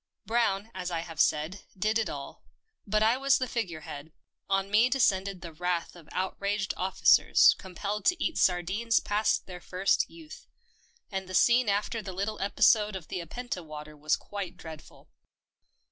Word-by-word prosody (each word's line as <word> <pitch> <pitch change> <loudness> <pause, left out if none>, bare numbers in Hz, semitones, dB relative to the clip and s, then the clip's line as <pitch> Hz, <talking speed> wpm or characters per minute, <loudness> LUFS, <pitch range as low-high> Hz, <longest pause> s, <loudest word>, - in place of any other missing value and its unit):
Brown, 220 -1 0
as 180 -1 -4
I 170 -2 -2
have 165 -2 -2
said, 155 +6 0 0.2
did 215 +4 +1
it 220 - -1
all; 140 -1 -8 0.4
but 215 +1 +2
I 225 +3 +4
was 275 0 +3
the 255 - -2
figure 185 -10 -3
head 145 +1 -9 0.2
— - - -52
on 195 +1 -7
me 225 +4 +5
descended 195 -7 +1
the 170 -2 -8
wrath 180 +1 -2
of 165 -3 -15
outraged 195 +1 -2
officers 190 +1 +5
compelled 200 +3 -5
to 360 0 +4
eat 330 - -1
sardines 190 +6 +2
past 210 +1 0
their 180 -2 -9
first 185 +2 +1
youth, 325 -2 -13 0.6
and 190 -1 -4
the 185 - -4
scene 240 -1 +4
after 210 +3 0
the 195 -3 -7
little 200 +3 -3
episode 210 +1 +3
of 180 -4 -8
the 185 - -3
Apenta 180 +2 -5
water 150 -1 -9
was 150 +1 +1
quite 200 -3 -7
dreadful. 160 -3 -12
195 Hz, 170 wpm, -29 LUFS, 175-215 Hz, 0.6 s, me